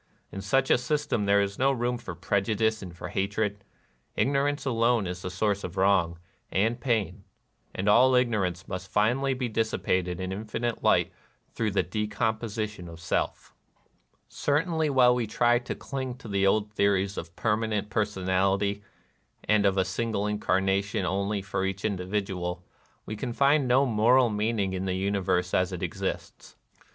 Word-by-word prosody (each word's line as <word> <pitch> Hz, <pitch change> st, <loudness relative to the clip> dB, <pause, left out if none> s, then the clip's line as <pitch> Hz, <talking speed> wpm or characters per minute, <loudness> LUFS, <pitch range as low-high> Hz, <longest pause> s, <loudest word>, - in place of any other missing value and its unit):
In 95 Hz, -, -6 dB
such 130 Hz, +7 st, +1 dB
a -, -, +5 dB
system 125 Hz, -5 st, -1 dB
there 100 Hz, 0 st, +4 dB
is 100 Hz, 0 st, -5 dB
no 135 Hz, +1 st, +4 dB
room 120 Hz, -1 st, -1 dB
for 90 Hz, -7 st, -7 dB
prejudice 110 Hz, +5 st, 0 dB
and 90 Hz, -3 st, -9 dB
for -, -, -6 dB
hatred. 100 Hz, +1 st, -2 dB, 0.5 s
Ignorance 145 Hz, +2 st, +1 dB
alone 115 Hz, -3 st, +2 dB
is 90 Hz, 0 st, -5 dB
the 90 Hz, -, -4 dB
source 100 Hz, +2 st, -1 dB
of 90 Hz, +2 st, -6 dB
wrong 95 Hz, -3 st, +2 dB, 0.3 s
and 115 Hz, +5 st, +1 dB
pain; 105 Hz, -6 st, -1 dB, 0.5 s
and 95 Hz, -, -2 dB
all 125 Hz, +5 st, +6 dB
ignorance 100 Hz, -8 st, 0 dB
must 90 Hz, 0 st, -6 dB
finally 130 Hz, +6 st, +1 dB
be 125 Hz, -1 st, -2 dB
dissi 110 Hz, 0 st, -1 dB
pated 90 Hz, -1 st, 0 dB
in 95 Hz, 0 st, -3 dB
infinite 110 Hz, +4 st, -3 dB
light -, -, +3 dB, 0.4 s
through 115 Hz, -2 st, -1 dB
the 100 Hz, -, +1 dB
decomposi 110 Hz, +1 st, -2 dB
tion 90 Hz, -5 st, -10 dB
of 85 Hz, 0 st, -10 dB
Self, 90 Hz, -, -2 dB, 0.7 s
Certainly 155 Hz, +2 st, 0 dB
while 125 Hz, -3 st, +5 dB
we 125 Hz, -2 st, 0 dB
still 110 Hz, -, -12 dB
try 120 Hz, 0 st, +4 dB
to 125 Hz, -, -5 dB
cling 130 Hz, -2 st, -5 dB
to 125 Hz, -, -11 dB
the 100 Hz, -1 st, +1 dB
old 105 Hz, +1 st, +1 dB
theories 100 Hz, -1 st, +1 dB
of 85 Hz, 0 st, -7 dB
permanent 105 Hz, -1 st, -1 dB
personality, 100 Hz, 0 st, 0 dB, 0.6 s
and 105 Hz, -1 st, +3 dB
of 95 Hz, 0 st, +1 dB
a 95 Hz, -, +3 dB
single 105 Hz, +2 st, -2 dB
incarnation 100 Hz, -1 st, 0 dB
only 100 Hz, +1 st, -1 dB
for 95 Hz, 0 st, -2 dB
each 95 Hz, +1 st, -3 dB
individual, 90 Hz, -3 st, -2 dB, 0.4 s
we 110 Hz, -, -5 dB
can 120 Hz, +3 st, -4 dB
find 140 Hz, +1 st, +3 dB
no 130 Hz, +3 st, +4 dB
moral 120 Hz, +1 st, +4 dB
meaning 105 Hz, -2 st, 0 dB
in 95 Hz, 0 st, -3 dB
the 95 Hz, -1 st, -1 dB
universe 95 Hz, -2 st, 0 dB
as 95 Hz, +1 st, +2 dB
it 90 Hz, -2 st, -5 dB
exists. -, -, -5 dB
105 Hz, 165 wpm, -27 LUFS, 95-120 Hz, 0.7 s, all